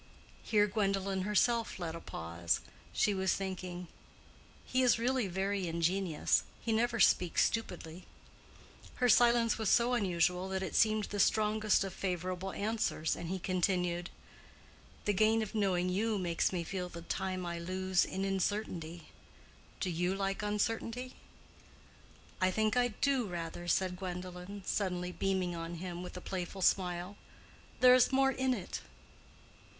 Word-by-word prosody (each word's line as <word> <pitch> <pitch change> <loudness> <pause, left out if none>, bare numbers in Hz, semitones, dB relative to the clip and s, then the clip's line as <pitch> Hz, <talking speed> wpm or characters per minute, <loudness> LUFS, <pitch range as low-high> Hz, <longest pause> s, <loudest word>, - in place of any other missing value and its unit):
Here 210 -2 +3
Gwendolen 195 -2 0
herself 230 +3 +1
left 170 -3 -4
a - - -6
pause. 85 - -2 0.3
She 210 - +2
was 190 -1 +1
thinking, 180 -2 -5 0.8
"He 255 - +1
is 250 -4 +5
really 245 -1 +1
very 190 +1 -1
ingenious. 170 0 +1 0.2
He 230 - -2
never 235 +1 +1
speaks 180 -2 +4
stupidly." 180 -6 -4 0.9
Her 250 - +2
silence 235 -1 +4
was 220 - +1
so 240 +1 +4
unusual 180 -4 +1
that 190 0 -2
it 185 - -4
seemed 215 -1 +3
the 205 0 -4
strongest 215 +1 +3
of 195 -2 -5
favorable 185 0 -3
answers, 210 -6 -1
and 170 - -6
he 190 - -1
continued: 180 -1 0 1.0
"The 205 - +2
gain 220 +3 +3
of 215 - -7
knowing 190 -4 +1
you 210 +4 0
makes 175 -3 0
me 175 -2 -2
feel 180 +1 -4
the 170 -1 -9
time 185 +1 -3
I 170 -1 -3
lose 185 +1 +1
in 190 +1 -3
uncertainty. 180 -4 -2 0.7
Do 185 - -1
you 175 +3 0
like 195 0 -2
uncertainty?" 225 +4 -2 1.3
"I 185 - +4
think 215 +4 +1
I 245 0 +4
do, 250 +1 0
rather," 175 -1 -5
said 180 +1 +1
Gwendolen, 180 +1 -6
suddenly 180 -3 -1
beaming 185 -2 -1
on 165 +1 -5
him 175 0 -5
with 180 0 -7
a - - -7
playful 185 +1 -4
smile. 180 +1 +1 0.6
"There 250 0 +9
is 255 +1 +5
more 270 0 +4
in 260 -1 +1
it." 195 - -6
190 Hz, 145 wpm, -33 LUFS, 180-215 Hz, 1.3 s, There